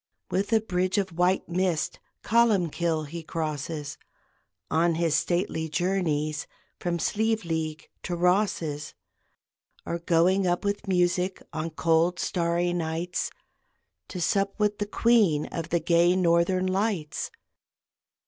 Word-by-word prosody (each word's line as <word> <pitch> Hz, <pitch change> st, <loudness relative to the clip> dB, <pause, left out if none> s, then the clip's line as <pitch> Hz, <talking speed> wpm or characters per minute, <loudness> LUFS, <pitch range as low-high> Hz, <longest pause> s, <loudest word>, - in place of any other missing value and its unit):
With 195 Hz, +4 st, 0 dB
a 225 Hz, -, +5 dB
bridge 185 Hz, -2 st, 0 dB
of 190 Hz, -4 st, -1 dB
white 180 Hz, +2 st, +2 dB
mist 175 Hz, -2 st, -1 dB, 0.2 s
Columbkill 175 Hz, -8 st, +2 dB
he 165 Hz, +3 st, -6 dB
crosses, 155 Hz, -2 st, -4 dB, 0.7 s
On 165 Hz, +2 st, +3 dB
his 165 Hz, -2 st, +1 dB
stately 175 Hz, -2 st, 0 dB
journeys 155 Hz, -3 st, -1 dB, 0.3 s
From 175 Hz, -1 st, -1 dB
Slieveleague 165 Hz, -7 st, -1 dB
to 175 Hz, -, -3 dB
Rosses; 175 Hz, -4 st, 0 dB, 0.9 s
Or 170 Hz, -, -3 dB
going 180 Hz, +3 st, +3 dB
up 175 Hz, +3 st, 0 dB
with 200 Hz, 0 st, -2 dB
music, 180 Hz, 0 st, +1 dB
On 160 Hz, +1 st, -2 dB
cold 165 Hz, +2 st, +2 dB
starry 175 Hz, 0 st, 0 dB
nights, 170 Hz, +1 st, -2 dB, 0.8 s
To 180 Hz, -, -6 dB
sup 195 Hz, +3 st, +1 dB
with 210 Hz, -1 st, +1 dB
the 205 Hz, -, -1 dB
Queen 210 Hz, -9 st, +3 dB
Of 165 Hz, -1 st, -4 dB
the 170 Hz, -, +2 dB
gay 170 Hz, +2 st, +3 dB
Northern 185 Hz, +1 st, +2 dB
Lights. 185 Hz, -4 st, -1 dB
175 Hz, 120 wpm, -27 LUFS, 165-190 Hz, 0.9 s, a